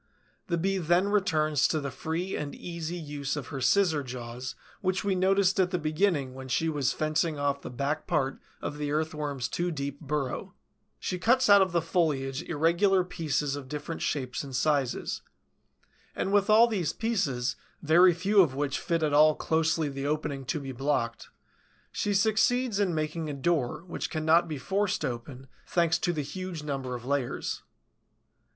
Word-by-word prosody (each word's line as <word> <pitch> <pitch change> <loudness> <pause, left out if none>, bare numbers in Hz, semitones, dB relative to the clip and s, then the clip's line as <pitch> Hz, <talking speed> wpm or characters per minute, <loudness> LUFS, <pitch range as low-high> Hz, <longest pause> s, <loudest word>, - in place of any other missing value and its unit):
The 170 - 0
Bee 195 +3 0
then 175 +3 +2
returns 155 -8 +2
to 155 - 0
the 140 -2 -4
free 160 +7 -3
and 145 -1 -4
easy 170 -1 -5
use 145 -3 -4
of 150 - -6
her 135 - -5
scissor 155 +4 +3
jaws 125 -1 -6 0.3
which 185 0 0
we 200 -1 +1
noticed 190 +1 +3
at 185 -1 +3
the 180 - 0
beginning 155 -4 0
when 130 0 -8
she 160 +5 +1
was 145 -5 0
fencing 155 0 0
off 140 0 0
the - - -7
back 140 +5 -2
part 135 -1 0 0.2
of 150 - -4
the 145 -1 -2
Earthworm's 150 -4 -2
too 175 +1 -1
deep 140 -3 -4
burrow; 145 -3 -3 0.4
she 180 - -3
cuts 245 +3 +4
out 200 -1 +9
of 190 -2 +2
the 170 -2 +1
foliage 150 -5 0
irregular 175 +5 +2
pieces 150 -5 -1
of 140 -2 -7
different 150 +4 -5
shapes 130 -2 -2
and 135 -2 -7
sizes; 140 -2 0 0.9
and 195 - -1
with 205 0 +3
all 220 +2 +8
these 200 -9 -1
pieces, 145 - -1 0.3
very 170 +4 +6
few 195 +4 +4
of 145 -8 +1
which 140 -1 -1
fit 165 -1 -1
at 150 -2 +1
all 155 +1 +6
closely 160 -1 +1
the 140 0 -4
opening 150 -2 -2
to 155 - -1
be 135 -1 -6
blocked, 130 -3 -2 0.6
she 205 -1 -1
succeeds 220 +2 +2
in 190 -5 +1
making 155 +1 -2
a - - -3
door 150 0 0
which 175 - -4
cannot 160 +2 +3
be 155 -2 -4
forced 195 +5 -1
open, 130 +1 -6 0.2
thanks 170 -1 +2
to 175 - +1
the 155 -4 -2
huge 185 0 -6
number 135 -4 -3
of 120 0 -8
layers. 140 -2 -2
155 Hz, 175 wpm, -28 LUFS, 140-180 Hz, 0.9 s, out